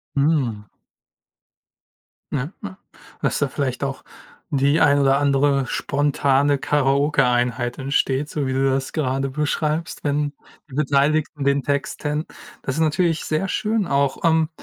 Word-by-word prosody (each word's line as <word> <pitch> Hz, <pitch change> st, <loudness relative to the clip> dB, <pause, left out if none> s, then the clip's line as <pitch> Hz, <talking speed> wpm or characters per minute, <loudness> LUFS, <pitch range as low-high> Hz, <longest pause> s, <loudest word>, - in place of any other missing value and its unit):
Mhm. 135 Hz, -8 st, 0 dB, 1.6 s
Ja, 135 Hz, 0 st, -2 dB
ja. 195 Hz, -2 st, -7 dB, 0.4 s
Dass -, -, 0 dB
da 145 Hz, -, +1 dB
vielleicht 135 Hz, -1 st, -3 dB
auch 135 Hz, -1 st, -4 dB, 0.5 s
die 140 Hz, +2 st, +2 dB
ein 145 Hz, -2 st, +5 dB
oder 135 Hz, -1 st, +4 dB
andere 140 Hz, -1 st, +2 dB
spontane 140 Hz, 0 st, +1 dB
Karaoke-Einheit 135 Hz, -4 st, +1 dB
entsteht, 135 Hz, +1 st, 0 dB
so 145 Hz, -2 st, -2 dB
wie 130 Hz, -, -1 dB
du 135 Hz, +1 st, +2 dB
das 135 Hz, 0 st, -1 dB
gerade 135 Hz, -3 st, -1 dB
beschreibst, 150 Hz, +3 st, -2 dB
wenn 145 Hz, 0 st, 0 dB, 0.4 s
die 130 Hz, -, -10 dB
Beteiligten 150 Hz, +1 st, +1 dB
den 140 Hz, 0 st, +2 dB
Text 140 Hz, 0 st, -2 dB
kennen. 150 Hz, +2 st, -2 dB, 0.4 s
Das 130 Hz, -, -2 dB
ist 160 Hz, -, 0 dB
natürlich 160 Hz, +1 st, +1 dB
sehr 155 Hz, +5 st, -1 dB
schön 215 Hz, 0 st, 0 dB
auch. 140 Hz, -2 st, 0 dB
Ähm, 160 Hz, -1 st, +3 dB
140 Hz, 135 wpm, -22 LUFS, 135-150 Hz, 1.6 s, ein